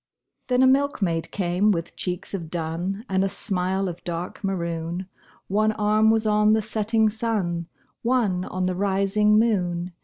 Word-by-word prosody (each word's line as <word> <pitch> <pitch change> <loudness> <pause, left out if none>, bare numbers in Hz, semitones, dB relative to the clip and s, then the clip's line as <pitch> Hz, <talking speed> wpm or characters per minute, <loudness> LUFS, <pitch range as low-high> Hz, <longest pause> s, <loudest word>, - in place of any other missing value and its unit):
Then 250 0 +3
a - - +6
milkmaid 230 - +1
came 185 +2 +1
with 170 -4 -1
cheeks 180 +1 -5
of 170 -5 -4
dun 175 +6 -3
And 190 0 +1
a 195 - +1
smile 190 -1 -1
of 175 -1 -6
dark 175 +3 -5
maroon, 170 -1 -2 0.4
One 215 +2 +2
arm 215 +1 +3
was 220 0 +2
on 210 0 +4
the 220 - +3
setting 220 +1 +1
sun, 205 -7 -2 0.3
One 225 -7 +1
on 185 0 -2
the 185 - 0
rising 200 +2 +2
moon. 180 -6 +1
195 Hz, 155 wpm, -24 LUFS, 175-215 Hz, 0.4 s, a